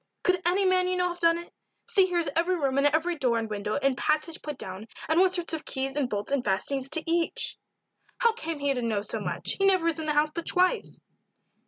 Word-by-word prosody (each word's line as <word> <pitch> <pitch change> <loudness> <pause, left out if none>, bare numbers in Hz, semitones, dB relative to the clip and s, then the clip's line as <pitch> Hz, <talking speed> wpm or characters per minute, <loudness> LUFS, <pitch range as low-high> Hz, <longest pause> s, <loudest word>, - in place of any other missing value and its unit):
"Could 365 -1 +2
any 380 +3 +2
man 370 -1 +3
you 365 - 0
know 360 0 +1
have 350 0 -7
done 335 -1 +3
it? 345 0 -10 0.3
See 385 -2 +4
here 355 -1 -1
is 340 - 0
every 345 +3 +2
room 275 -5 0
and 285 - +4
every 320 +4 +1
door 245 -4 +2
and 225 -1 -2
window 210 0 -3
and 275 -2 +1
passage 310 +4 -1
put 295 -3 -6
down, 190 +1 -8 0.2
and 320 +2 +2
what 370 0 +4
sort 345 -2 -1
of 315 -1 -3
keys 270 0 -3
and 280 -4 0
bolts 205 +3 -3
and 280 -3 +1
fastenings 265 +7 0
to 320 - +1
each." 335 0 -1 0.6
"How 465 -1 +3
came 330 -8 -4
he 285 -1 0
to 250 - -3
know 220 -3 -1
so 215 +2 -3
much; 180 -4 -1
he 390 - +3
never 370 -3 +3
was 330 -2 0
in 315 - -4
the 300 - +1
house 300 +1 +2
but 335 +1 -6
twice." 365 +6 +1
315 Hz, 245 wpm, -27 LUFS, 265-355 Hz, 0.6 s, See